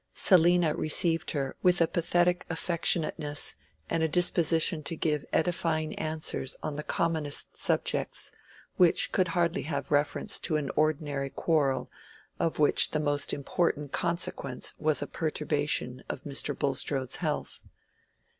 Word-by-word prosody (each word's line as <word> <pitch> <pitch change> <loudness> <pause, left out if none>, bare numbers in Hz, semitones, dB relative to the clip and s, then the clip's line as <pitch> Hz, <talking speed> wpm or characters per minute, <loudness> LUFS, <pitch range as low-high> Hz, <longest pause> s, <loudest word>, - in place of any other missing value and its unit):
"Selina" 175 -3 +5
received 165 +1 +1
her 140 -3 -2
with 180 -1 +4
a 165 - +5
pathetic 175 +1 +1
affectionateness 165 -3 +1 0.3
and 165 - -1
a 160 - +2
disposition 165 0 +2
to 160 +3 -4
give 150 -2 -1
edifying 160 -2 0
answers 155 -4 0
on 150 - -3
the 150 - -4
commonest 155 -2 0
topics, - - -1 0.5
which 175 -2 +4
could 185 -1 +1
hardly 170 +2 0
have 140 -1 -4
reference 145 0 +1
to 155 - 0
an 145 -3 -3
ordinary 145 -2 0
quarrel 145 -3 0 0.5
of 165 - -1
which 150 - +3
the 155 - -1
most 145 -1 +1
important 145 0 -1
consequence 170 -6 -1
was 155 -2 +1
a - - -4
perturbation 150 -5 -1
of 130 - -5
Mr. 145 0 0
Bulstrode's 135 -1 -1
health. - - -3
155 Hz, 130 wpm, -28 LUFS, 145-170 Hz, 0.5 s, Selina